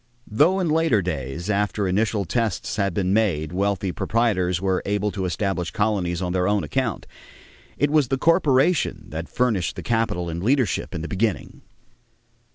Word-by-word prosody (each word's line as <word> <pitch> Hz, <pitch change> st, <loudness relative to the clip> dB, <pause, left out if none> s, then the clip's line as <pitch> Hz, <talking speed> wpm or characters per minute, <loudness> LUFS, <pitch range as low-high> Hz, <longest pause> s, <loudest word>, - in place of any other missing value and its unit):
Though 160 Hz, -, +3 dB
in 180 Hz, -, 0 dB
later 155 Hz, -, +2 dB
days, 80 Hz, 0 st, -4 dB
after 105 Hz, -1 st, 0 dB
initial 100 Hz, +1 st, 0 dB
tests 110 Hz, 0 st, -2 dB
had 100 Hz, -2 st, +1 dB
been 95 Hz, -1 st, +1 dB
made, 85 Hz, -8 st, +1 dB
wealthy 100 Hz, 0 st, 0 dB
proprietors 95 Hz, -6 st, 0 dB
were 95 Hz, 0 st, 0 dB
able 105 Hz, +1 st, -1 dB
to 95 Hz, -2 st, -3 dB
establish 90 Hz, 0 st, -2 dB
colonies 95 Hz, -5 st, -1 dB
on 90 Hz, 0 st, -2 dB
their 90 Hz, -1 st, +1 dB
own 100 Hz, -2 st, +1 dB
account, 75 Hz, -, -2 dB, 0.7 s
it 145 Hz, 0 st, +1 dB
was 150 Hz, -4 st, +3 dB
the 135 Hz, +2 st, 0 dB
corporation 160 Hz, 0 st, +2 dB
that 80 Hz, +2 st, -6 dB
furnished 115 Hz, -9 st, 0 dB
the -, -, -7 dB
capital 110 Hz, -7 st, 0 dB
and 85 Hz, +1 st, -4 dB
leadership 125 Hz, 0 st, 0 dB
in 80 Hz, -, -4 dB
the -, -, -4 dB
beginning. 100 Hz, +2 st, -2 dB
100 Hz, 165 wpm, -23 LUFS, 90-115 Hz, 0.7 s, Though